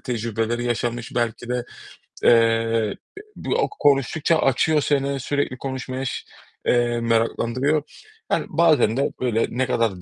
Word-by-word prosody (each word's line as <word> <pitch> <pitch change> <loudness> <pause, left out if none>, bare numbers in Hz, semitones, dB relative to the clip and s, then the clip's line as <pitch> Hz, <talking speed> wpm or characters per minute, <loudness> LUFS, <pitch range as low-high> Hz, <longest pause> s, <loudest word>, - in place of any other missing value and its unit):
tecrübeleri 115 -1 -2
yaşamış, 120 0 -2
belki 120 0 -2
de, 125 0 -1 0.6
eee, - - +6 0.9
e - - -12
bu - - -2
o - - +1
konuştukça 145 +4 +2
açıyor 150 +3 +2
seni, 140 -1 0
sürekli 140 0 -2
konuşmaya 130 0 -4
ş 125 - -4 0.4
eee, 120 -1 +2
meraklandırıyor. 115 +5 +1 0.5
Yani - - +1
bazen 155 -8 +3
de, 140 - +1
böyle, 115 -3 +1
ne 130 +2 -1
kadar 115 -7 0
125 Hz, 130 wpm, -23 LUFS, 115-140 Hz, 0.9 s, eee